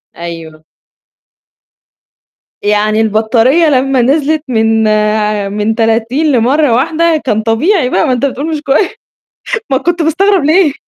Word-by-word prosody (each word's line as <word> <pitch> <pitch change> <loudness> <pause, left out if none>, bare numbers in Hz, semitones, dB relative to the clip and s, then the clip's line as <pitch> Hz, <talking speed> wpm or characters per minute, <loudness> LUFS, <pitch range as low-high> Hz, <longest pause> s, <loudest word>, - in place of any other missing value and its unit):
أيوه. 165 -2 -9 2.0
يعني 210 +1 +1
البطارية 225 +9 +2
لمّا 265 -1 +1
نزلت 295 +4 0
من 225 -2 +1
ع 210 -1 0
من 210 +2 -2
30 235 +7 0
لمرّة 255 +2 +2
واحدة 315 +5 0
كان 220 -3 0
طبيعي 255 - 0
بقى 190 - +1
ما 255 - +1
أنت 250 +3 -1
بتقول 280 +3 -3
مش 305 -2 -3
كوي 310 +7 +1 0.8
ما 265 - +1
كنت 345 +3 -2
مستغرب 360 +2 +1
ليه؟ 315 -2 +3
250 Hz, 125 wpm, -11 LUFS, 220-310 Hz, 2.0 s, ليه